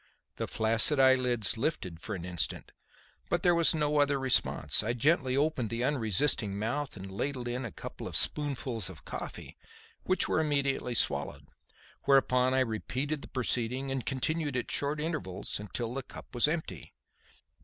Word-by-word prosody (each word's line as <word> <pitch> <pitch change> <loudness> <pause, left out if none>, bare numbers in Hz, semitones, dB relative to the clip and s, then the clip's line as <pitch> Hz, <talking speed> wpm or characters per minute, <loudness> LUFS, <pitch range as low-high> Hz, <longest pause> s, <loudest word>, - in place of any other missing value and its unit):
The - - -3
flaccid 115 +6 +4
eyelids 125 -5 +3
lifted 95 - -2
for 105 +3 -5
an 90 -2 -7
instant 90 -2 -3 0.6
but 175 - 0
there 175 - +5
was 170 -1 +4
no 150 -1 +1
other 140 -1 +2
response. 130 -1 +3
I 110 +2 -1
gently 130 +1 +2
opened 140 -6 0
the 115 +1 -2
unresisting 115 -5 +1
mouth 120 +5 -3
and 95 0 -8
ladled 125 +5 -3
in 125 +1 -3
a 115 - -6
couple - - -8
of - - -6
spoonfuls 130 -9 +2
of 85 -5 -13
coffee, - - -7 0.4
which 185 - +1
were - - +1
immediately 140 -5 0
swallowed; 70 -9 0 0.6
whereupon 130 -2 +3
I 130 - +3
repeated 130 +5 -2
the - - -9
proceeding 130 +1 -2
and 135 -2 -2
continued 145 +2 -2
at 120 - -3
short 145 +1 0
intervals 150 - -3
until 115 +4 -4
the 135 - -3
cup - - -13
was 120 +3 +3
empty. 150 - -4
130 Hz, 160 wpm, -30 LUFS, 110-145 Hz, 0.6 s, there